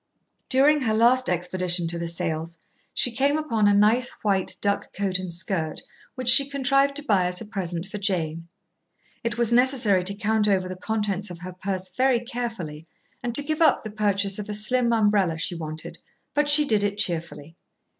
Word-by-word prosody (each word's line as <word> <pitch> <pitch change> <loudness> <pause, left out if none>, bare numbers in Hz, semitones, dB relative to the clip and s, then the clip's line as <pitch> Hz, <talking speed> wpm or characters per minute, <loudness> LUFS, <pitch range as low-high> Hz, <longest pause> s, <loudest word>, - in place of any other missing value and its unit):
During 285 +3 +3
her 220 -4 0
last 245 +3 +3
expedition 180 0 0
to 170 0 -3
the 170 - -3
sales 165 0 -4 0.3
she 245 - +2
came 275 +5 +1
upon 230 -9 0
a 205 - +4
nice 225 +5 +3
white 195 -3 0
duck 200 0 -1
coat 195 -2 -1
and 185 -2 -6
skirt 170 -2 -3 0.3
which 255 -2 -6
she 270 +3 +8
contrived 275 0 +1
to 295 - -4
buy 195 -9 +2
as 180 0 -2
a - - -7
present 180 -5 -4
for 205 +1 -7
Jane. 165 -5 -2 0.8
It 235 0 -2
was 235 -1 +1
necessary 240 -7 +3
to 200 +2 0
count 215 0 +1
over 190 -2 +1
the 185 - -6
contents 205 0 -3
of 175 - -8
her 185 0 -7
purse 185 0 -4
very 260 0 +2
carefully 225 - -6 0.3
and 240 -1 -4
to 290 - +4
give 310 +2 -3
up 310 -5 +4
the 215 - -7
purchase 200 -1 0
of 210 - -6
a 210 - -2
slim 235 +3 +1
umbrella 205 -7 +2
she 165 +2 -2
wanted, 155 -1 -7 0.3
but 295 0 +1
she 295 +1 +6
did 215 -6 +2
it 205 0 -1
cheerfully. 165 -4 -3
205 Hz, 190 wpm, -24 LUFS, 180-240 Hz, 0.8 s, she